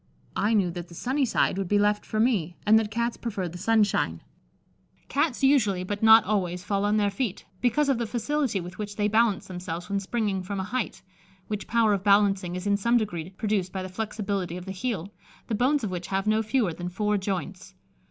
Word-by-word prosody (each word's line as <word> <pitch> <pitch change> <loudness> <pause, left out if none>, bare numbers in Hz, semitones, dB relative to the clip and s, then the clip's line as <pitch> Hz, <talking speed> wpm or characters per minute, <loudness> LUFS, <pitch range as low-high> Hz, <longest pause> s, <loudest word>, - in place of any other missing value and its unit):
I 220 +2 +2
knew 190 -4 +2
that 175 0 -6
the 170 - -13
sunny 265 - 0
side 195 - +1
would 195 - -2
be 205 - +2
left 205 0 +1
for 215 - -2
me, 205 -8 +1
and 220 +1 +6
that 220 -2 -2
Cats 235 +2 -1
prefer 200 -6 -3
the 175 +1 -8
sunshine." 205 - +1 0.9
Cats 280 -2 0
usually, 215 -10 +3
but 205 +2 -4
not 220 0 +8
always, 180 -3 -1
fall 200 +1 0
on 210 +1 +2
their 205 -1 +2
feet, 205 -1 -3 0.2
because 250 +4 +2
of 270 -4 +2
the 235 - -1
facility 245 0 -1
with 175 +1 -8
which 205 -1 -5
they 210 0 +1
balance 215 -2 +2
themselves 180 -1 -6
when 200 - +1
springing 200 -1 -1
from 195 +2 -4
a - - -1
height, 245 +4 -3 0.5
which 210 -1 -4
power 230 -2 +3
of 195 -2 -1
balancing 200 -3 +3
is 180 +1 -5
in 200 0 +2
some 235 +4 +3
degree 175 -7 -3
produced 195 -1 -1
by 190 -1 -4
the 185 - -6
flexibility 200 -3 -3
of 180 - -8
the 190 - -5
heel, 200 -2 -3 0.3
the 230 - -4
bones 260 +6 +2
of 205 - -2
which 180 -1 -4
have 195 0 -1
no 215 +1 +2
fewer 220 -4 0
than 175 +2 -5
four 210 +3 0
joints. 190 - -4
205 Hz, 215 wpm, -26 LUFS, 185-225 Hz, 0.9 s, not